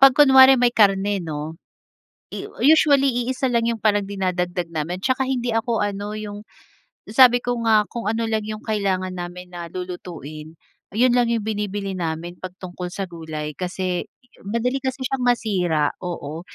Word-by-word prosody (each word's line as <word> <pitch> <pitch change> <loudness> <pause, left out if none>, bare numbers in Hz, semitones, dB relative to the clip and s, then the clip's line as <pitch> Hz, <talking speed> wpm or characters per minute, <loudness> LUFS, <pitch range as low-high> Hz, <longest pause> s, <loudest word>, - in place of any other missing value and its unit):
'Pag 270 -1 +9
kunwari 265 -2 +8
may 245 -1 +4
karne 200 -2 +3
'no. 155 +1 -5 1.1
Usually 275 -4 +4
iisa 260 0 -1
lang 235 -1 +2
'yong 230 -2 -2
parang 205 -2 +3
dinadagdag 180 -3 -2
namin 160 +3 -2
'tsaka 260 +2 +1
hindi 245 -2 -1
ako 225 0 0
ano 205 +1 -4
'yong 205 -1 -6 0.7
sabi 245 0 +7
ko 245 0 0
nga 215 -2 +4
kung 235 -3 -5
ano 225 +1 0
lang 220 -1 0
'yong 215 0 -6
kailangan 195 -4 -1
namin 180 0 -7
na 170 -1 -6
lulutuin, 165 -4 -7 0.4
'yon 245 +2 +4
lang 245 -1 +3
'yong 225 -3 -1
binibili 205 -2 -3
namin 170 0 -4
'pag 185 -1 -7
tungkol 180 -1 -6
sa 195 -1 -3
gulay 155 -3 -6
kasi 180 0 -3 0.4
madali 245 +4 0
kasi 260 +1 -3
siyang 270 0 -2
masira 180 -11 +1
oo, 160 -3 -5
205 Hz, 155 wpm, -22 LUFS, 180-240 Hz, 1.1 s, Pag